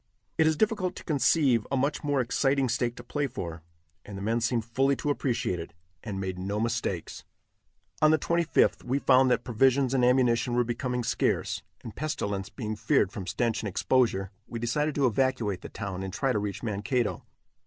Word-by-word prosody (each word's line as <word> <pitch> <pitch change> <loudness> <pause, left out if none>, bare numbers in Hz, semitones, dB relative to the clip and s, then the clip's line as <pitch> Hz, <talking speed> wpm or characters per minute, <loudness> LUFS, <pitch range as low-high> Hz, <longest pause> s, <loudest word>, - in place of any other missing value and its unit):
It 160 - +5
is 160 -1 +2
difficult 205 -3 0
to - - -9
conceive 140 - +2
a 135 - +1
much 140 +4 0
more 145 -2 +1
exciting 135 +2 +1
stake 120 0 0
to 120 - -10
play 145 +4 -2
for, 85 -11 -6 0.4
and 100 - -8
the - - -6
men 115 +3 0
seemed 115 -1 0
fully 135 +4 +1
to 145 +4 -1
appreciate 120 -10 -1
it, 85 0 -8 0.3
and 100 -4 -4
made 95 -1 -4
no 100 +3 -2
mistakes. 115 -6 -2 0.8
On 155 - +6
the 155 - +5
25th 170 +1 +2
we 130 +3 0
found 130 -2 +4
that 125 -1 +2
provisions 130 +2 +2
and 130 -2 +2
ammunition 125 -1 +3
were 120 - +3
becoming 125 +1 -2
scarce, 115 - 0 0.2
and 110 - -8
pestilence 100 -10 -3
being 110 -4 -4
feared 110 -1 +2
from 95 -3 -6
stench 115 +5 0
and 105 - -3
exposure, 95 -2 +1 0.2
we 115 - -6
decided 145 +6 -1
to 140 - +2
evacuate 120 -5 0
the - - -8
town 100 -3 -5
and 95 0 -4
try 135 +7 0
to 105 - +1
reach 100 0 -4
Mankato. 110 +2 -1
120 Hz, 190 wpm, -28 LUFS, 105-135 Hz, 0.8 s, On